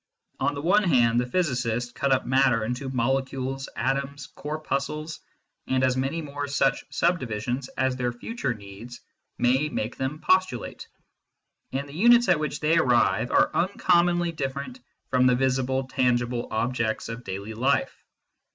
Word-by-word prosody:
On 145 Hz, +2 st, 0 dB
the 140 Hz, -, -5 dB
one 200 Hz, +5 st, +4 dB
hand 120 Hz, -, +3 dB
the 125 Hz, -, -3 dB
physicists 125 Hz, -7 st, -1 dB
cut 135 Hz, +2 st, -1 dB
up 130 Hz, -, +2 dB
matter 130 Hz, -3 st, +3 dB
into 125 Hz, +3 st, -3 dB
molecules, 135 Hz, +1 st, -1 dB
atoms, 135 Hz, +2 st, -2 dB
corpuscles, 150 Hz, +1 st, -4 dB, 0.5 s
and 130 Hz, 0 st, +1 dB
as 130 Hz, -1 st, +3 dB
many 135 Hz, +6 st, -2 dB
more 145 Hz, 0 st, -5 dB
such 140 Hz, -1 st, +1 dB
subdivisions 125 Hz, -6 st, -1 dB
as 130 Hz, -1 st, +1 dB
their 125 Hz, -1 st, -1 dB
future 135 Hz, -, -4 dB
needs 105 Hz, +4 st, -11 dB, 0.4 s
may 130 Hz, +5 st, +2 dB
make 110 Hz, -4 st, -3 dB
them 135 Hz, +3 st, -2 dB
postulate, 170 Hz, -5 st, 0 dB, 0.8 s
and 140 Hz, +2 st, -3 dB
the 140 Hz, -, -12 dB
units 235 Hz, +6 st, +5 dB
at 175 Hz, -3 st, +4 dB
which 150 Hz, -1 st, -3 dB
they 160 Hz, +2 st, +3 dB
arrive 125 Hz, -7 st, +3 dB
are 295 Hz, +1 st, +3 dB
un 180 Hz, -, +2 dB
commonly 175 Hz, -1 st, +3 dB
different 135 Hz, -3 st, -5 dB, 0.3 s
from 130 Hz, 0 st, +4 dB
the 125 Hz, -, +4 dB
visible, 130 Hz, +1 st, 0 dB
tangible 120 Hz, -2 st, 0 dB
objects 115 Hz, 0 st, -1 dB
of 115 Hz, +2 st, -7 dB
daily 100 Hz, +2 st, -6 dB
life. 130 Hz, +5 st, 0 dB
130 Hz, 150 wpm, -26 LUFS, 125-150 Hz, 0.8 s, units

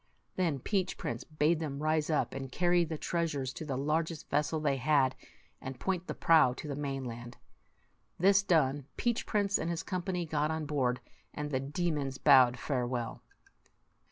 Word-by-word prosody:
Then 170 Hz, -6 st, +1 dB
Peach 190 Hz, -, -1 dB
Prince 120 Hz, 0 st, -4 dB
bade 155 Hz, +1 st, +1 dB
them 145 Hz, -2 st, -4 dB
rise 155 Hz, 0 st, +1 dB
up 155 Hz, -, 0 dB
and 135 Hz, -1 st, -6 dB
carry 175 Hz, +3 st, +3 dB
the 160 Hz, -1 st, -4 dB
treasures 150 Hz, -6 st, -2 dB
to 160 Hz, -, -7 dB
the 135 Hz, -3 st, -3 dB
largest 155 Hz, +3 st, -1 dB
vessel 150 Hz, +2 st, +1 dB
they 145 Hz, -3 st, +1 dB
had, 130 Hz, -1 st, +3 dB, 0.5 s
and 130 Hz, -1 st, -7 dB
point 185 Hz, -2 st, -2 dB
the -, -, -4 dB
prow 155 Hz, -6 st, +5 dB
to -, -, -9 dB
78 -, -, -2 dB
the 145 Hz, -, -5 dB
mainland. 125 Hz, -4 st, -5 dB, 0.8 s
This 195 Hz, +2 st, +5 dB
done, 145 Hz, -7 st, +1 dB
Peach 240 Hz, -1 st, -1 dB
Prince 205 Hz, -2 st, +1 dB
and 165 Hz, -, -2 dB
his 170 Hz, -1 st, -2 dB
company 180 Hz, -1 st, -2 dB
got 150 Hz, -1 st, 0 dB
on 160 Hz, -1 st, -2 dB
board, 130 Hz, -4 st, 0 dB, 0.3 s
and 150 Hz, 0 st, -4 dB
the 130 Hz, -, +1 dB
demons 145 Hz, -1 st, -2 dB
bowed 130 Hz, -4 st, +6 dB
farewell. 125 Hz, -3 st, -2 dB
150 Hz, 170 wpm, -31 LUFS, 135-170 Hz, 0.8 s, bowed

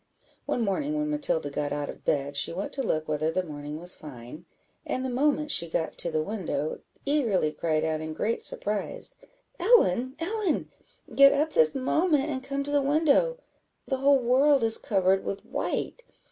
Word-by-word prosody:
One 245 Hz, -, 0 dB
morning, 290 Hz, +10 st, -1 dB
when 300 Hz, 0 st, -1 dB
Matilda 275 Hz, -, 0 dB
got 145 Hz, +1 st, -2 dB
out 145 Hz, 0 st, -2 dB
of -, -, -9 dB
bed, 140 Hz, 0 st, -1 dB
she 140 Hz, -, +1 dB
went 185 Hz, +4 st, -5 dB
to 275 Hz, -, -1 dB
look 155 Hz, -10 st, -1 dB
whether 155 Hz, +1 st, 0 dB
the 185 Hz, +3 st, -1 dB
morning 150 Hz, -2 st, -7 dB
was 175 Hz, +3 st, -1 dB
fine, 145 Hz, +2 st, -10 dB, 0.4 s
and 255 Hz, -, -3 dB
the -, -, -2 dB
moment 295 Hz, +3 st, +1 dB
she 170 Hz, -8 st, +4 dB
got 160 Hz, 0 st, -2 dB
to 170 Hz, -, +4 dB
the 155 Hz, -1 st, -1 dB
window, 185 Hz, -6 st, -3 dB, 0.3 s
eagerly 235 Hz, -, +1 dB
cried 155 Hz, -1 st, -1 dB
out, 155 Hz, -1 st, -1 dB
in 155 Hz, 0 st, -5 dB
great 225 Hz, +7 st, -1 dB
surprise 210 Hz, -, -1 dB, 0.5 s
"Ellen, 260 Hz, -, +3 dB
Ellen! 380 Hz, +1 st, -2 dB, 0.4 s
get 275 Hz, 0 st, +7 dB
up 300 Hz, +2 st, 0 dB
this 155 Hz, -1 st, +4 dB
moment, 300 Hz, +2 st, +1 dB
and 260 Hz, -2 st, -4 dB
come 275 Hz, +1 st, -3 dB
to 290 Hz, -, -4 dB
the 290 Hz, -1 st, +3 dB
window; 310 Hz, -, +2 dB, 0.5 s
the 265 Hz, -, -1 dB
whole 275 Hz, +1 st, +4 dB
world 265 Hz, +2 st, +3 dB
is 225 Hz, 0 st, +2 dB
covered 190 Hz, -1 st, +1 dB
with 195 Hz, 0 st, -5 dB
white! -, -, -3 dB
230 Hz, 180 wpm, -27 LUFS, -, 0.5 s, get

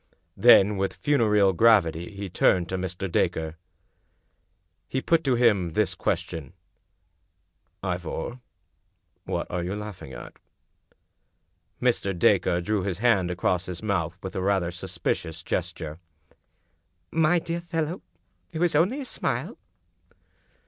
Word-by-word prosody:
Then 105 Hz, -2 st, +6 dB
with 95 Hz, 0 st, -1 dB
funereal 105 Hz, -9 st, +3 dB
gravity 85 Hz, -5 st, +3 dB
he 100 Hz, -1 st, -6 dB
turned 90 Hz, -1 st, +2 dB
to 95 Hz, -, -2 dB
Mr. 95 Hz, +1 st, -3 dB
Dacre. 80 Hz, -2 st, 0 dB, 1.3 s
He 130 Hz, -, -1 dB
put 165 Hz, +4 st, +2 dB
to 130 Hz, -2 st, +3 dB
him 105 Hz, -8 st, +2 dB
this -, -, +1 dB
question: 80 Hz, 0 st, -3 dB, 0.6 s
" -, -, -47 dB
Ivor, 90 Hz, +5 st, -4 dB, 0.9 s
what -, -, -2 dB
are 90 Hz, 0 st, -2 dB
you 90 Hz, +3 st, -3 dB
laughing 105 Hz, -9 st, -7 dB
at?" -, -, -10 dB, 1.4 s
Mr. 105 Hz, -7 st, 0 dB
Dacre 85 Hz, +1 st, +3 dB
drew 105 Hz, +2 st, 0 dB
his 90 Hz, -2 st, -2 dB
hand 105 Hz, -5 st, +2 dB
across 90 Hz, 0 st, 0 dB
his 90 Hz, +2 st, -6 dB
mouth 90 Hz, -6 st, -1 dB
with 95 Hz, -, -6 dB
rather 95 Hz, -2 st, +1 dB
a -, -, -8 dB
suspicious 80 Hz, -1 st, -3 dB
gesture. 85 Hz, -3 st, -4 dB, 0.6 s
" 85 Hz, -1 st, -46 dB, 0.2 s
My 175 Hz, +3 st, +4 dB
dear 170 Hz, 0 st, -3 dB
fellow, 170 Hz, 0 st, -3 dB, 0.5 s
only 175 Hz, -, +2 dB
a -, -, -5 dB
smile -, -, -3 dB
95 Hz, 120 wpm, -26 LUFS, 85-115 Hz, 1.4 s, Then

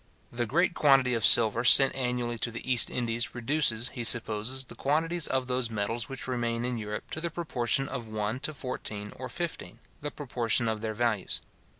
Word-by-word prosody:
The 120 Hz, 0 st, -2 dB
great 170 Hz, +9 st, +1 dB
quantity 135 Hz, -5 st, +4 dB
of 115 Hz, -2 st, -1 dB
silver 115 Hz, +1 st, +5 dB
sent 135 Hz, +2 st, +7 dB
annually 125 Hz, -2 st, -2 dB
to 120 Hz, -, +1 dB
the 115 Hz, +2 st, -8 dB
East 125 Hz, -2 st, +5 dB
Indies 120 Hz, -1 st, -2 dB
reduces, 120 Hz, -2 st, +1 dB
he 125 Hz, -3 st, -6 dB
supposes, 115 Hz, +3 st, +2 dB
the 130 Hz, -, -13 dB
quantities 165 Hz, +3 st, 0 dB
of 130 Hz, -1 st, 0 dB
those 125 Hz, -2 st, -1 dB
metals 115 Hz, +2 st, -3 dB
which 135 Hz, -1 st, -7 dB
remain 120 Hz, -2 st, -2 dB
in 125 Hz, -2 st, -2 dB
Europe 105 Hz, -1 st, -6 dB
to 160 Hz, -, -4 dB
the 170 Hz, -, -2 dB
proportion 135 Hz, -6 st, -1 dB
of 125 Hz, -5 st, -5 dB
one 110 Hz, +2 st, -3 dB
to 155 Hz, -, -2 dB
fourteen 105 Hz, -6 st, -6 dB
or 130 Hz, 0 st, -7 dB
fifteen, 170 Hz, +4 st, -5 dB, 0.2 s
the 145 Hz, -, -3 dB
proportion 120 Hz, -5 st, 0 dB
of 110 Hz, -1 st, -2 dB
their 110 Hz, -1 st, -4 dB
values. 110 Hz, -4 st, -1 dB
120 Hz, 190 wpm, -28 LUFS, 115-135 Hz, 0.2 s, sent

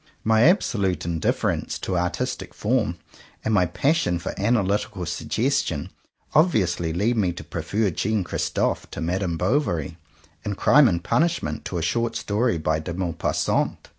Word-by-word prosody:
My 110 Hz, 0 st, +3 dB
absolute 100 Hz, -, +2 dB
indifference 85 Hz, -2 st, -1 dB
to 95 Hz, -, -3 dB
artistic 90 Hz, +9 st, -2 dB
form, 105 Hz, -6 st, 0 dB, 0.5 s
and 110 Hz, -, +1 dB
my 90 Hz, -4 st, +4 dB
pas 140 Hz, -, +1 dB
sion 90 Hz, -, 0 dB
for 85 Hz, -, -5 dB
analytical 100 Hz, -3 st, 0 dB
suggestion, -, -, -1 dB, 0.4 s
obviously 100 Hz, -, +2 dB
lead 105 Hz, +8 st, +1 dB
me 95 Hz, -5 st, +2 dB
to 90 Hz, -, -8 dB
prefer 105 Hz, -2 st, -1 dB
Jean 105 Hz, +4 st, 0 dB
Christophe -, -, -1 dB
to -, -, -7 dB
Madame 90 Hz, 0 st, -1 dB
Bovary; 90 Hz, -, 0 dB, 0.4 s
and 100 Hz, -2 st, -3 dB
Crime 135 Hz, +4 st, +6 dB
and 85 Hz, -4 st, 0 dB
Pun -, -, +2 dB
ishment 170 Hz, 0 st, -1 dB
to 90 Hz, -, -3 dB
a 85 Hz, -, -2 dB
short 115 Hz, +6 st, 0 dB
story 110 Hz, 0 st, 0 dB
by 80 Hz, 0 st, 0 dB
De 85 Hz, +2 st, -5 dB
Mau 90 Hz, -2 st, -1 dB
passant. 80 Hz, -, -1 dB
95 Hz, 155 wpm, -24 LUFS, 85-115 Hz, 0.5 s, Crime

